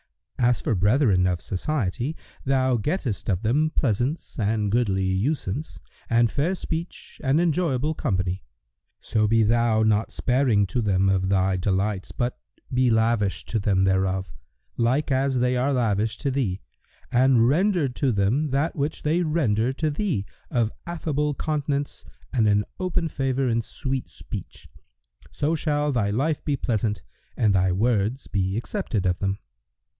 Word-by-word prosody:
"—As 120 0 +3
for - - 0
brethren 100 -1 +3
of 90 -2 0
society, 120 - -2 0.3
thou 130 -1 +2
gettest 120 - -2
of 95 +1 0
them 145 +8 +2
pleasance 130 +2 -1
and 105 -1 0
goodly 100 -5 +1
usance 110 +6 -2 0.3
and 115 -1 +3
fair 160 +7 0
speech 170 -1 -6
and 135 +3 +3
enjoyable 160 -4 +1
company; 95 - -2 0.6
so 110 -1 +1
be 115 +1 +4
thou 115 0 +3
not 110 0 +2
sparing 125 -5 +2
to 120 +5 -1
them 95 -3 +2
of 95 -1 +1
thy 95 -1 +2
delights, 95 +1 -1
but 120 0 -2 0.3
be 125 0 +3
lavish 110 -3 +1
to 110 - -1
them 95 -2 +2
thereof, 95 -2 0 0.4
like 130 +5 +1
as 135 0 +1
they 125 +1 +2
are 130 +3 +1
lavish 110 -4 0
to 140 - -2
thee, 115 -9 -1 0.5
and 125 -2 +4
render 175 +2 +2
to 130 +1 0
them 115 +9 +1
that 140 +5 0
which 145 +2 -2
they 160 +4 +2
render 130 -8 +1
to 155 +3 -1
thee 145 - -1 0.2
of 115 -3 +1 0.2
affable 150 -4 -1
countenance 145 -1 -2 0.3
and 115 -5 +3
an 105 0 +3
open 180 -2 0
favour 135 -2 -1
and 115 -1 +1
sweet 130 +3 -4
speech, - - -9 0.6
so 150 +3 0
shall 150 -2 0
thy 110 -6 +1
life 140 +9 0
be 145 -2 0
pleasant 110 -4 -1 0.3
and 105 -3 +3
thy 95 -1 +3
words 110 +5 0
be 95 0 -1
accepted 110 -3 -2
of 90 -1 +1
them." 95 0 -1
120 Hz, 150 wpm, -24 LUFS, 100-145 Hz, 0.6 s, be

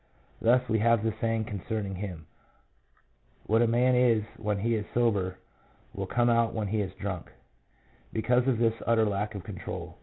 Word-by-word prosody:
Thus, 125 +2 +3
we 110 -1 +1
have 115 0 +3
the 110 -1 0
saying 115 -1 0
concerning 100 0 -4
him, 90 -4 -6 0.6
" - - -38
What 110 +2 +3
a 120 - +4
man 125 +2 +3
is 120 -3 +4
when 105 -1 -1
he 115 +4 0
is 110 -2 0
sober 100 -6 +1 0.6
will 95 -1 -4
come 120 +4 +2
out 115 -1 +2
when 105 -3 -2
he 110 +1 0
is 95 -2 -5
drunk," 95 -4 -5 0.8
because 125 +3 +1
of 130 -3 +2
his 115 -1 +3
utter 115 -1 +4
lack 105 +1 -2
of 100 - -6
control. - - -7
110 Hz, 180 wpm, -28 LUFS, 100-115 Hz, 0.8 s, a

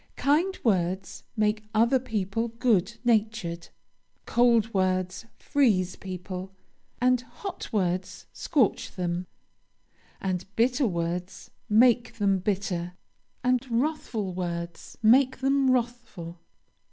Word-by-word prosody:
Kind 330 +7 +2
words 190 -3 0
make 215 0 +1
other 235 +4 +4
people 225 -2 -2
good 230 -3 +1
natured. 215 -7 0 0.6
Cold 235 -2 +3
words 185 +2 0
freeze 210 -11 +2
people, 185 0 -7 0.4
and 250 0 +3
hot 255 - -8
words 185 -3 -1
scorch 270 - +1
them, 175 0 -2 0.9
and 185 -1 -2
bitter 250 +3 +2
words 175 0 -4 0.2
make 235 +2 +4
them 200 -3 +2
bitter, 180 -3 -2 0.5
and 250 0 +2
wrathful 230 - -1
words 170 -1 -5
make 260 +4 +5
them 270 0 +2
wrathful. 235 -9 -2
215 Hz, 100 wpm, -27 LUFS, 185-245 Hz, 0.9 s, make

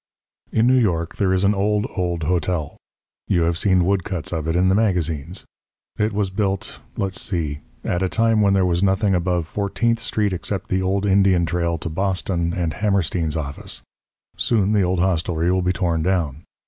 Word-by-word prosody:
In 110 - +3
New 130 +1 +5
York 85 -7 0
there 95 -3 +2
is 95 0 +2
an 100 +1 +4
old, 105 +1 +1
old 85 -3 -1
hotel. 85 -2 -1 0.5
You 85 - +2
have 85 +1 +1
seen 90 0 +3
woodcuts 90 -4 -1
of 80 -2 -2
it 80 - 0
in 90 +1 +3
the 95 - +4
magazines. 90 -5 0 0.5
It 105 +1 0
was 100 -2 -1
built 95 -1 -2 0.2
let's 95 -1 -1
see 80 -6 -1 0.2
at 90 - -1
a 95 - +1
time 115 0 +2
when 100 -1 +4
there 95 -1 +3
was 85 -1 +1
nothing 95 +1 +2
above 90 -1 0
Fourteenth 105 +6 0
Street 105 -3 0
except 95 +2 -4
the 95 0 +1
old 95 +2 0
Indian 95 -3 +4
trail 85 0 -1
to 85 - -6
Boston 90 -1 -1
and 85 -3 -1
Hammerstein's 90 -6 0
office. 75 -2 -5 0.5
Soon 105 -4 +1
the 105 - +3
old 90 -1 +1
hostelry 85 -1 +1
will 95 0 +2
be 90 0 +1
torn 85 -2 0
down. 80 -5 -1
95 Hz, 185 wpm, -22 LUFS, 85-100 Hz, 0.5 s, New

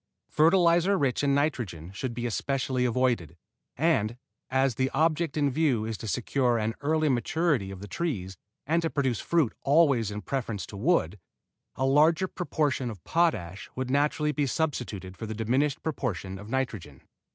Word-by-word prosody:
Fertilizer 170 +3 +4
rich 140 -3 0
in 140 -1 +3
nitrogen 115 - -2
should 120 +4 -4
be 120 0 -3
especially 130 +2 -1
avoided, 120 -10 0 0.4
and, 125 -8 +1 0.3
as 130 0 +2
the 130 +4 0
object 160 -1 +1
in 145 -2 +2
view 130 -6 +1
is 110 0 -3
to 110 - -6
secure 120 +3 +1
an 110 0 -1
early 155 +2 +1
maturity 135 - +1
of 95 -1 -8
the 100 - -7
tree 115 - -2 0.4
and 165 +4 +2
to 165 - -1
produce 135 -7 0
fruit 165 -9 +1
always 140 -7 +3
in 105 0 -6
preference 115 -7 -3
to - - -11
wood, 105 - +1 0.6
a 130 - 0
larger 155 +6 +4
proportion 150 -9 -1
of 105 -7 -9
potash 100 - 0
would 130 0 -3
naturally 150 +2 +1
be 145 -1 0
substituted 120 - -3
for 110 - -6
the 110 - -5
diminished 130 +6 0
proportion 100 - -3
of 105 +2 -10
nitrogen. 110 - -3
130 Hz, 165 wpm, -27 LUFS, 110-155 Hz, 0.6 s, Fertilizer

